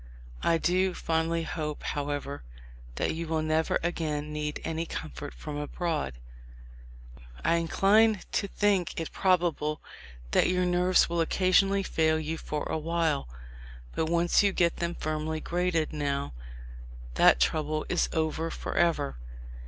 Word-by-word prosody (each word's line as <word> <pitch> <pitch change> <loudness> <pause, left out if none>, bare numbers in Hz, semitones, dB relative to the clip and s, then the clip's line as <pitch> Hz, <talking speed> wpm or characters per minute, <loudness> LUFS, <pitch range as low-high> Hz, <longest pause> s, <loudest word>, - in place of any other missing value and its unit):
I 165 - +3
do 185 +2 +1
fondly 165 +1 0
hope, 155 -2 -4
however, 145 -1 -3 0.5
that - - 0
you 165 +1 -4
will 160 -1 0
never 155 +1 +1
again 150 -3 -2
need 150 0 -3
any 165 +1 -2
comfort 145 -2 -6
from 150 -1 -7
abroad... 150 - -2 1.3
I 170 - +4
incline 205 +6 +4
to 200 - 0
think 195 -4 +1
it 165 - -4
probable 170 -5 +1 0.5
that - - +4
your 180 0 +2
nerves 180 +1 +3
will 170 0 0
occasionally 195 +3 +3
fail 160 -3 +1
you 160 +1 -3
for 150 -1 -3
awhile; 160 - -1 0.6
but 160 - 0
once 170 +1 +3
you 200 -1 +3
get 170 -3 +1
them 170 0 -2
firmly 155 0 -2
graded 175 -2 0
now, 140 - -2 0.8
that - - +5
trouble 155 - 0
is 180 - +1
over 160 0 -1
forever. 160 - 0
160 Hz, 130 wpm, -28 LUFS, 155-175 Hz, 1.3 s, that